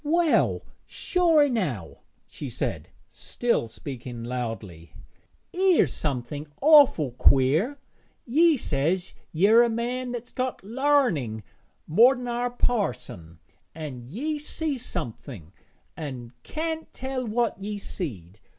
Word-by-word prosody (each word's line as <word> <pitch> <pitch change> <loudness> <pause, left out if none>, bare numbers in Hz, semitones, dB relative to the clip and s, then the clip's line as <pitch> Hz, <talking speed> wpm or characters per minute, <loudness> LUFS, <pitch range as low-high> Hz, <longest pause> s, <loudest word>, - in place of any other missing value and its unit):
'Well, 330 +1 +2 0.2
sure 335 -4 +3
enow,' 180 - -2 0.3
she - - -8
said, - - -3 0.2
still 235 - -1
speaking 120 -1 -7
loudly, 115 -9 -6 0.6
''ere's 370 -1 +3
somethin' 145 +1 -3
awful 280 - +6
queer, 140 - +3 0.5
ye 315 +5 +4
says 170 - -1 0.2
yer 205 +8 +5
a 240 - +3
man 245 +2 -2
that's 245 0 -6
got 255 -4 -3
larning 220 - +1 0.4
more 235 - +6
ner 245 0 -2
parson, 195 - -2 0.4
an' 135 -7 -7
ye 295 - -3
sees 295 -3 -3
somethin', 120 - -6 0.4
an' 130 -7 -7
can't 320 0 -4
tell 260 0 -4
what 230 -3 -1
ye's 205 0 -4
seed. 105 - -6
210 Hz, 105 wpm, -26 LUFS, -, 0.6 s, awful